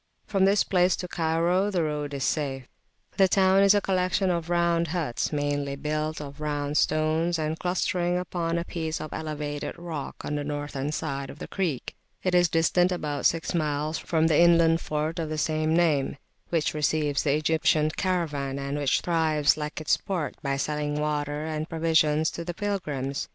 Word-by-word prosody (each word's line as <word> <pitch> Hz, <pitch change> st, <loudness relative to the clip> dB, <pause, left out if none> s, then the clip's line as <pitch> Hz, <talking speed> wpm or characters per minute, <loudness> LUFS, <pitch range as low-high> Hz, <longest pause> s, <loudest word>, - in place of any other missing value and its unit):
From 195 Hz, -2 st, +2 dB
this 200 Hz, +1 st, +4 dB
place 180 Hz, -1 st, +3 dB
to 180 Hz, -, -5 dB
Cairo 170 Hz, +4 st, +1 dB
the 180 Hz, -5 st, 0 dB
road 150 Hz, -2 st, -3 dB
is 135 Hz, -, -3 dB
safe. 135 Hz, -4 st, -1 dB, 0.5 s
The 195 Hz, -, +6 dB
town 190 Hz, +1 st, +4 dB
is 200 Hz, +1 st, +6 dB
a 205 Hz, -, +3 dB
collection 185 Hz, 0 st, +1 dB
of 170 Hz, -1 st, -2 dB
round 170 Hz, -1 st, +2 dB
huts 160 Hz, -7 st, -2 dB
meanly 145 Hz, -1 st, -1 dB
built 155 Hz, +2 st, -2 dB
of 145 Hz, 0 st, -8 dB
round 145 Hz, -1 st, -1 dB
stones, 155 Hz, +2 st, +1 dB
and 155 Hz, 0 st, -2 dB
clustering 180 Hz, -1 st, 0 dB
upon 170 Hz, -2 st, -2 dB
a 170 Hz, -, -2 dB
piece 160 Hz, -2 st, -3 dB
of 155 Hz, -, -6 dB
elevated 150 Hz, -2 st, -4 dB
rock 165 Hz, -4 st, -6 dB
on -, -, -3 dB
the 145 Hz, 0 st, -1 dB
northern 145 Hz, -1 st, -3 dB
side 140 Hz, -3 st, -3 dB
of -, -, -9 dB
the -, -, -7 dB
creek. 170 Hz, -10 st, -2 dB, 0.3 s
It 185 Hz, -, 0 dB
is 175 Hz, 0 st, +5 dB
[p.215] -, -, -27 dB
distant 175 Hz, +2 st, +3 dB
about 150 Hz, -5 st, -3 dB
six 165 Hz, +2 st, -1 dB
miles 155 Hz, -1 st, -1 dB
from 160 Hz, -2 st, +1 dB
the 160 Hz, -2 st, +4 dB
inland 170 Hz, -1 st, +5 dB
fort 155 Hz, +2 st, -2 dB
of 160 Hz, -2 st, -2 dB
the 155 Hz, -, -3 dB
same 155 Hz, +1 st, +1 dB
name, 155 Hz, -5 st, +2 dB, 0.3 s
which 165 Hz, -3 st, 0 dB
receives 150 Hz, -1 st, +1 dB
the 140 Hz, -1 st, +2 dB
Egyptian 155 Hz, 0 st, +2 dB
caravan, 150 Hz, -8 st, -1 dB
and 140 Hz, +1 st, -3 dB
which 140 Hz, -2 st, +2 dB
thrives, 155 Hz, -4 st, +2 dB
like 150 Hz, +1 st, -5 dB
its 155 Hz, -, +2 dB
port, 185 Hz, -7 st, -3 dB
by 140 Hz, -2 st, -1 dB
selling 150 Hz, +1 st, -2 dB
water 150 Hz, 0 st, -2 dB
and 155 Hz, 0 st, -3 dB
provisions 160 Hz, -1 st, +2 dB
to 170 Hz, -, -6 dB
pilgrims. 150 Hz, -10 st, -3 dB
155 Hz, 180 wpm, -26 LUFS, 150-170 Hz, 0.5 s, The